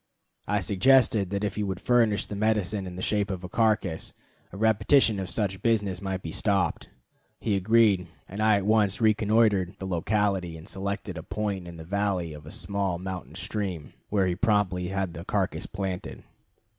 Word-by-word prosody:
I 105 -1 +1
suggested 110 0 +4
that 100 +1 -2
if 105 - -2
he - - 0
would 95 -2 -3
furnish 115 -4 +2
the 105 - -6
medicine 105 -2 0
in 90 - -7
the 90 - -5
shape 105 -1 0
of 95 -2 -4
a - - -4
carcass, 105 -6 0 0.4
a 95 - -9
repetition 110 +1 +4
of 95 - -4
such 95 -4 0
business 105 -6 +1
might 95 -1 -3
be 80 - -5
stopped. 100 +1 0 0.5
He 105 - 0
agreed, 100 -2 +3 0.2
and 100 +3 -5
I 110 -1 +5
at 100 - -2
once 105 -2 +2
reconnoitered 110 -4 +3
the 95 - -6
locality 95 -1 0
and 80 +3 -12
selected 100 0 -4
a - - -5
point 100 -2 -3
in 85 -1 -9
the 80 - -8
valley 95 -3 -1
of 75 0 -11
a - - -7
small 95 0 -2
mountain 95 0 -6
stream, 95 -8 -4 0.2
where 100 -2 +2
he 90 - +1
promptly 95 -3 +1
had 95 -2 -2
the 85 - -7
carcass 95 -4 -1
planted. 95 -2 -5
100 Hz, 180 wpm, -27 LUFS, 90-105 Hz, 0.5 s, I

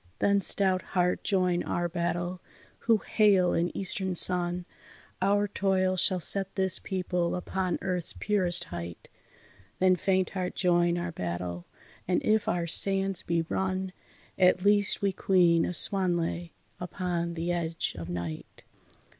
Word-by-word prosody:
Then 200 0 +2
stout 190 -1 +4 0.2
heart 180 0 +1
join 180 -3 0
our 175 0 -2
battle! 175 +1 -3 0.4
who 230 -1 +2
hail 200 -4 +3
an 170 +1 0
eastern 190 -1 -2
sun, 175 0 +4 0.6
Our 205 +2 +2
toil 190 -2 0
shall 185 0 +2
set 195 +2 +1
this 190 -2 +2
people 180 -2 -2
upon 185 0 -3
earth's 180 -3 -2
purest 185 -4 +2
height. 85 0 -8 0.7
Then 185 0 +3
faint 185 0 0
heart 185 -2 -4
join 175 -1 +1
our 175 0 -4
battle! 85 - -5 0.4
and 180 - +1
if 215 0 +1
our 175 -1 -1
sands 195 +2 +2
be 170 -1 -1
run, 185 +2 -3 0.5
At 185 0 +3
least 205 -1 +2
we 195 -1 +1
caoin 175 -4 +2
a - - -3
swan 185 -1 +2
lay 170 0 -4 0.3
upon 175 -1 -4
the 170 +1 -3
edge 170 -1 -3
of 85 -2 -8
night. 85 -2 -7
180 Hz, 140 wpm, -27 LUFS, 170-190 Hz, 0.7 s, stout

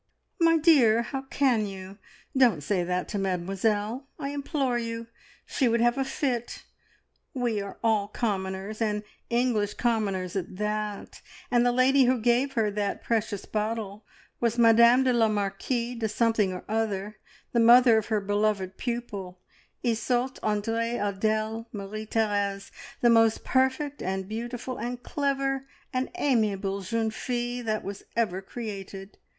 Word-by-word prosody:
"My 330 -1 +5
dear, 260 -9 +5
how 270 +2 -4
can 245 -7 +2
you? 195 +1 -9 0.4
Don't 240 - +4
say 180 +3 0
that 180 +1 -2
to 205 - -2
Mademoiselle, 205 +6 -1
I 275 -2 -4
implore 280 -3 -1
you! 230 0 -4 0.4
She 265 - +1
would 235 0 +2
have 240 +1 +3
a 270 - 0
fit. 250 -3 -3 0.7
We 240 -5 0
are 200 0 -7
all 215 -3 +2
commoners, 200 -1 -3
and 210 -1 0 0.3
English 235 -4 +1
commoners 200 -6 -1
at 185 -1 -4
that, 210 0 -3 0.3
and 240 -1 +4
the 245 - +3
lady 260 +2 +4
who 255 +1 +3
gave 245 +4 +2
her 220 -4 +1
that 205 -1 -2
precious 220 -3 -1
bottle 215 -1 -3 0.4
was 235 0 0
Madame 235 +2 +6
la 240 -3 +3
Marquise 220 +4 -2
de 220 -1 -1
Something 220 -3 +2
or 180 - -6
Other, 215 -1 -2 0.3
the 235 - +2
mother 235 0 +7
of 215 - -7
her 220 -1 +1
beloved 205 -2 0
pupil 205 -7 -4 0.4
Isoult 245 +2 0
Andree 225 +3 -1
Adele 215 +3 -1
Marie 210 +1 -6
Therese 205 -3 -1 0.3
the 240 - +5
most 225 -1 +4
perfect, 265 +2 0
and 190 0 -3
beautiful, 240 +3 -5
and 245 +1 -4
clever, 275 -1 -1 0.3
and 255 +1 -1
amiable 210 - 0
jeune 220 +3 -1
fille 245 +1 -3
that 215 -1 -1
was 200 0 -6 0.2
ever 195 -5 0
created!" 195 -2 -8
225 Hz, 145 wpm, -27 LUFS, 205-245 Hz, 0.7 s, mother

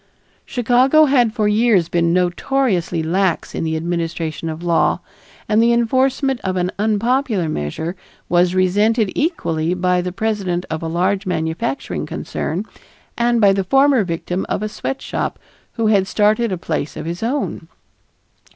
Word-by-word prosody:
Chicago 255 +5 +4
had 250 -5 +3
for 215 -2 0
years 210 -5 +3
been 170 0 +1
notoriously 180 -1 0
lax 185 +2 0
in - - -3
the 160 0 -1
administration 165 -1 -3
of 160 +2 -6
law, 170 -1 +2 0.5
and 215 +1 +3
the 235 +1 +4
enforcement 260 +3 +1
of 185 -1 -2
an 180 0 0
unpopular 220 - +1
measure 155 - -3 0.3
was 175 +1 +2
resented 205 +3 +2
equally 170 - -1
by 180 0 +1
the 180 0 -3
president 195 -3 -2
of 160 - -3
a 165 - -3
large 185 +4 0
manufacturing 165 - -2
concern - - -4 0.5
and 235 0 +2
by 200 -3 +5
the 195 0 0
former 270 +3 +4
victim 175 +1 -3
of - - -1
a 215 - -2
sweatshop 270 +5 -4 0.4
who 230 - -1
had 200 -3 +3
started 215 +2 +2
a 185 - -1
place 155 -3 -3
of - - -5
his 170 +2 -4
own. 255 +6 -2
195 Hz, 150 wpm, -19 LUFS, 175-235 Hz, 0.5 s, by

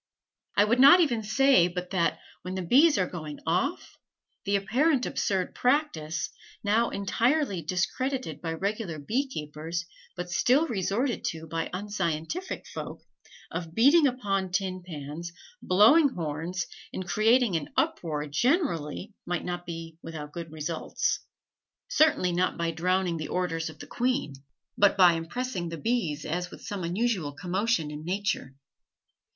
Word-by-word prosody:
I 205 - +7
would 230 +4 +2
not 280 +7 +9
even 255 -10 +2
say 220 -3 +4
but 180 0 -5
that, 175 -3 +1 0.2
when 185 +1 -5
the 190 - -2
bees 285 - +5
are 185 - +2
going 155 -5 -7
off, 185 - -1 0.5
the 200 0 +1
apparently 250 +8 +2
absurd 190 -3 -1
practice, 170 - 0 0.3
now 220 +3 +2
entirely 225 - +1
discredited 185 - -2
by 165 -1 -2
regular 195 -1 -3
bee 235 - -1
keepers 160 - -5 0.3
but 180 0 -5
still 250 - +3
resorted 230 - -1
to 160 0 -3
by 165 +1 -3
unscientific 200 - -3
folk, - - -7 0.5
of 165 -1 -5
beating 285 +7 +6
upon 200 -7 -1
tin 185 -1 -1
pans, 160 0 -7 0.3
blowing 225 - +6
horns, 170 - -3 0.3
and 185 - -5
creating 225 +1 +3
an 155 -3 -2
uproar 150 -3 0
generally, 185 - 0
might 175 0 -2
not 175 0 -4
be 165 -1 -7
without 155 -2 -7
good 165 -2 -6
results. 160 +1 -2 0.7
Certainly 310 - +3
not 180 +1 0
by 170 -1 0
drowning 180 +1 0
the 155 - -4
"orders" 165 -3 -1
of 155 - -12
the - - -9
queen, 250 - -1 0.4
but 200 -1 +4
by 180 -3 +7
impressing 175 +2 -3
the 165 - -5
bees 170 -8 -1
as 175 +3 -2
with - - -12
some 200 -3 -4
unusual 180 -4 -1
commotion 180 0 -1
in 150 +1 -7
nature. 180 -7 -2
185 Hz, 145 wpm, -28 LUFS, 165-235 Hz, 0.7 s, not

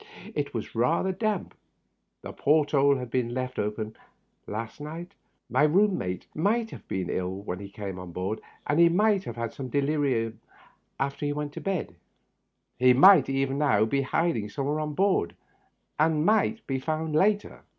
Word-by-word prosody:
It - - -2
was - - -5
rather 165 +11 +1
damp. 205 0 -2 0.7
The - - -7
port 150 0 +2
hole 140 -1 +4
had 125 -2 -6
been 120 -2 -1
left 130 0 -3
open 105 +1 -3 0.5
last 115 +6 -5
night. 165 +5 -7 0.3
My - - +1
room 190 +7 +4
mate 90 - -4
might 220 +7 0
have - - -11
been 95 -2 -2
ill 90 0 -2
when 90 -3 -4
he 100 -1 -8
came 100 -2 -6
on 90 -1 -8
board, 95 +5 -3 0.2
and 145 +2 +1
he 170 0 +7
might 200 +2 +2
have 120 - -6
become 115 +3 -5
delirious 140 -5 0 0.7
after 140 +2 -2
he 145 - 0
went 145 0 -4
to - - -7
bed. 185 - -3 0.8
He 125 0 +6
might 190 +9 +7
even 135 0 0
now 130 -8 +3
be 135 +5 0
hiding 130 -6 0
somewhere 145 +6 -2
on 150 -1 -3
board, 190 - +1 0.6
and 155 0 +2
might 220 +2 +2
be 135 -1 -2
found 155 +2 -2
later. 205 +5 +1
140 Hz, 170 wpm, -27 LUFS, 115-165 Hz, 0.8 s, he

